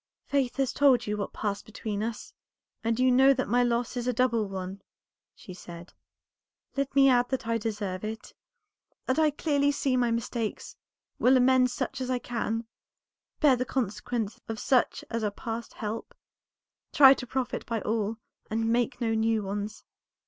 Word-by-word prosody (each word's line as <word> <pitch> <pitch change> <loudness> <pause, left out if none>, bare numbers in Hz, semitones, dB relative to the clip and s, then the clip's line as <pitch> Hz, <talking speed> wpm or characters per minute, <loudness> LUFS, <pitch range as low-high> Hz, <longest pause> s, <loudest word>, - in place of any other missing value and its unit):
"Faith 275 -3 0
has 270 -2 0
told 260 -5 +4
you 210 - -1
what 205 - -3
has - - -14
passed 205 -2 -2
between 215 -1 -4
us, 225 0 -5 0.5
and 230 +1 0
you 255 0 +4
know 265 +2 +6
that 260 - -1
my 245 +3 +3
loss 240 0 0
is 245 0 -3
a - - +3
double 235 -3 +1
one," 190 0 -6 0.5
she 185 - -11
said. 175 -1 -11 0.8
"Let 275 0 -2
me 275 -1 +7
add 245 -2 +4
that 265 -2 -2
I 230 0 0
deserve 205 -4 -3
it, 220 +1 -6 0.7
that 260 +4 +1
I 310 -1 +5
clearly 285 -1 +1
see 275 -2 0
my 245 -1 +2
mistakes, 230 -1 -3 0.4
will 260 +1 +5
amend 255 0 +4
such 270 +2 -4
as 255 - -3
I 255 - +1
can, 230 -2 -3 0.8
bear 290 -4 +6
the 250 - -1
consequences 225 -2 -3
of 225 - -4
such 255 +2 +1
as 230 -1 -2
are 210 - +1
past 225 +3 -6
help, 215 +1 -5 0.8
try 270 -2 +8
to 255 -2 -7
profit 255 0 -2
by 230 -1 -1
all, 220 0 -1 0.3
and 225 +1 0
make 245 +1 0
no 225 -1 +1
new 220 -1 +1
ones. 205 +2 -5
235 Hz, 175 wpm, -28 LUFS, 220-255 Hz, 0.8 s, try